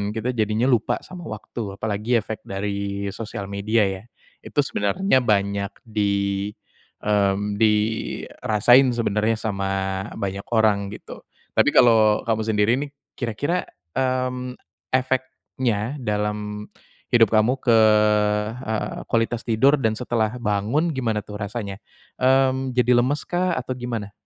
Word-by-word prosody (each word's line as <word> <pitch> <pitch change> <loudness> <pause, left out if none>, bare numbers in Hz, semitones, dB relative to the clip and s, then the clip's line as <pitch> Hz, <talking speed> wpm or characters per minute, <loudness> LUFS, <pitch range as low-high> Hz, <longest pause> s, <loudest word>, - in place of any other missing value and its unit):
kita 125 +3 -2
jadinya 110 +1 0
lupa 120 -4 +2
sama 180 -2 -9
waktu. 105 -1 -6
Apalagi 110 +3 0
efek 110 0 -4
dari 100 0 -3
sosial 105 -3 -6
media 105 +2 +1
ya? 95 0 -4 0.4
Itu - - -4
sebenarnya 130 - +1
banyak 100 -2 0
di 100 -2 0 0.6
mmm, 100 0 +1
dirasain 110 +3 +2
sebenernya 115 -1 0
sama 100 -3 -2 0.5
banyak 100 -1 -4
orang, 105 -3 +2
gitu. - - -10 0.3
Tapi - - +5
kalau 110 -3 +5
kamu 110 -1 +1
sendiri 105 0 +2
nih, 145 -1 -5 0.2
kira-kira 140 - -1 0.3
mmm, 130 -1 -1 0.3
efeknya 130 -2 -1
dalam 105 0 -2 0.5
hidup 115 -2 +5
kamu 110 +3 +4
ke 115 -3 +5 1.3
kualitas 115 +1 0
tidur 135 +6 +4
dan 110 -3 +1
setelah 115 -1 -1
bangun, 115 +11 0
gimana 115 -6 -1
tuh 105 -1 -8
rasanya? 100 -1 -5 0.4
Mmm, 130 0 +2
jadi 125 0 +3
lemes 145 +4 -1
kah 180 0 0
atau 125 0 -4
gimana? 115 -5 -4
110 Hz, 120 wpm, -23 LUFS, 105-125 Hz, 1.3 s, Tapi